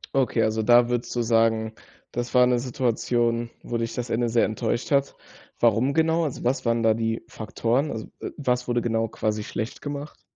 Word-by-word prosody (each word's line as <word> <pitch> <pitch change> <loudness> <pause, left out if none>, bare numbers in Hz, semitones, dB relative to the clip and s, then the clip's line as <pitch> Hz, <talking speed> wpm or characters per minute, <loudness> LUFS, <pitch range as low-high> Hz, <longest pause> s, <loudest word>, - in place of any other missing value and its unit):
Okay, 125 -4 +2
also 110 0 +1
da 120 +2 +5
würdest 120 0 -2
du 120 - +1
sagen, 115 -1 +2 0.4
das 120 0 -4
war 125 -1 +6
'ne 125 -1 +2
Situation, 120 -1 0
wo 120 - -3
dich 115 0 -3
das 120 -1 -4
Ende 120 +1 +1
sehr 115 0 +2
enttäuscht 115 +4 -2
hat. 140 -1 +2 0.5
Warum 120 +4 +3
genau? 160 +1 +2
Also, 145 - -5
was 125 +1 0
waren 115 0 +1
da 110 -1 +5
die 115 0 -2
Faktoren? 120 +7 -1
Also, 110 -1 -5
äh, - - -5
was 125 -3 -1
wurde 120 -1 +1
genau 115 -1 0
quasi 105 0 -2
schlecht 110 +1 -5
gemacht? 145 +1 -6
120 Hz, 190 wpm, -25 LUFS, 115-125 Hz, 0.5 s, war